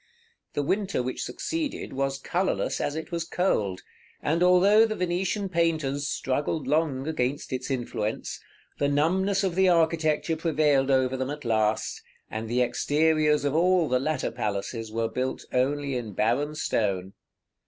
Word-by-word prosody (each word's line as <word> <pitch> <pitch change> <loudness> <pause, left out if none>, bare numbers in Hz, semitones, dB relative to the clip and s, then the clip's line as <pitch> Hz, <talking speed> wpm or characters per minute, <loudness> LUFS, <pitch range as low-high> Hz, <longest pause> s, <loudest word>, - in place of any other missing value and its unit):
The 145 - -1
winter 195 -3 0
which 130 +1 -4
succeeded 320 -3 -3
was 135 0 -1
colorless 180 +7 -1
as 145 - -1
it 160 - -6
was 170 -1 -1
cold; 105 - 0 0.4
and 160 +3 0
although 185 +4 +6
the 215 - -3
Venetian 185 +3 -1
painters 155 -5 0
struggled 145 +2 -1
long 145 -1 0
against 140 -3 -2
its 130 +1 -3
influence, 120 -4 -3 0.4
the 140 - +2
numbness 190 +7 +2
of 190 -3 0
the 190 +1 +4
architecture 160 -1 +2
prevailed 150 -4 +2
over 130 -1 +2
them 130 0 -2
at 145 -2 -6
last, 110 -1 0 0.3
and 110 0 -4
the 125 +1 +2
exteriors 150 +3 +2
of 145 - +1
all 175 +1 +3
the 125 -1 +2
latter 150 0 -1
palaces 110 0 -3
were 115 +1 0
built 130 +3 -3
only 140 +2 0
in 115 -4 -4
barren 140 +10 0
stone. 100 -9 -1
145 Hz, 150 wpm, -26 LUFS, 125-170 Hz, 0.4 s, although